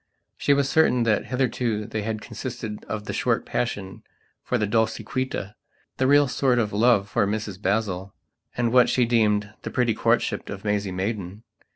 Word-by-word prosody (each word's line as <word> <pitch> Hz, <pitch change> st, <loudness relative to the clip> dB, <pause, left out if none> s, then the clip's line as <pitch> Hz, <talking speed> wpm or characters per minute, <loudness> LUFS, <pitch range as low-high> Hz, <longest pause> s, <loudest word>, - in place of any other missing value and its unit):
She 140 Hz, -, +2 dB
was 140 Hz, -1 st, +2 dB
certain 140 Hz, -4 st, +3 dB
that 110 Hz, -3 st, +1 dB
hitherto 120 Hz, -4 st, -1 dB
they 110 Hz, 0 st, -3 dB
had 110 Hz, 0 st, -4 dB
consisted 115 Hz, -1 st, -6 dB
of 110 Hz, -1 st, -4 dB
the -, -, -4 dB
short -, -, 0 dB
passion 100 Hz, -6 st, -3 dB, 0.4 s
for 125 Hz, -, -1 dB
the 105 Hz, -, +1 dB
Dolciquita, 110 Hz, 0 st, -1 dB, 0.4 s
the 130 Hz, -, +2 dB
real 145 Hz, +1 st, +5 dB
sort 130 Hz, -1 st, +1 dB
of 110 Hz, -4 st, 0 dB
love 105 Hz, -2 st, +3 dB
for 100 Hz, -, +1 dB
Mrs 105 Hz, -2 st, -4 dB
Basil, 100 Hz, -1 st, -1 dB, 0.5 s
and 120 Hz, -1 st, +1 dB
what 125 Hz, -1 st, +6 dB
she 125 Hz, -, +3 dB
deemed 105 Hz, -3 st, +1 dB
the -, -, -5 dB
pretty 120 Hz, -3 st, +1 dB
courtship -, -, 0 dB
of 100 Hz, +1 st, -7 dB
Maisie 105 Hz, -2 st, 0 dB
Maidan. 100 Hz, +1 st, -4 dB
110 Hz, 170 wpm, -24 LUFS, 105-125 Hz, 0.5 s, what